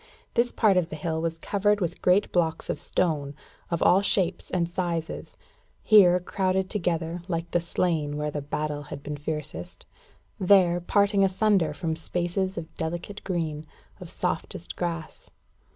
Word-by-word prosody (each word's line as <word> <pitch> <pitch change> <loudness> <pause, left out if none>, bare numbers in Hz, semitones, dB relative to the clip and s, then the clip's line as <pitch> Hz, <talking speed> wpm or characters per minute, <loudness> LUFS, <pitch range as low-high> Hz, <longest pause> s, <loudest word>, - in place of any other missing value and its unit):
This 240 +1 +2
part 205 -5 +3
of 175 -2 +1
the - - -5
hill 160 +1 -2
was 165 0 -2
covered 205 +4 +1
with 175 -4 -3
great 185 +3 +3
blocks 165 -2 0
of - - -4
stone, 145 -6 -1 0.3
of 170 - 0
all 190 - +6
shapes 190 -3 0
and 175 -2 0
sizes 170 -2 -3 0.5
here 180 -4 +7
crowded 190 +1 -1
together, 170 -3 -1
like 170 -2 -3
the 175 - +3
slain 165 -3 -1
where 150 0 -2
the 145 - -3
battle 150 +1 -3
had 140 -1 -8
been 150 - -4
fiercest; 145 - -6 0.5
there 180 -2 +5
parting 200 +2 +3
asunder 190 -4 +2
from 160 +1 -2
spaces 175 +3 -2
of 160 - -6
delicate 175 +5 -5
green 160 -4 -3 0.3
of 180 -3 -9
softest 170 +2 -3
grass. 170 -3 -5
170 Hz, 150 wpm, -26 LUFS, 160-190 Hz, 0.5 s, here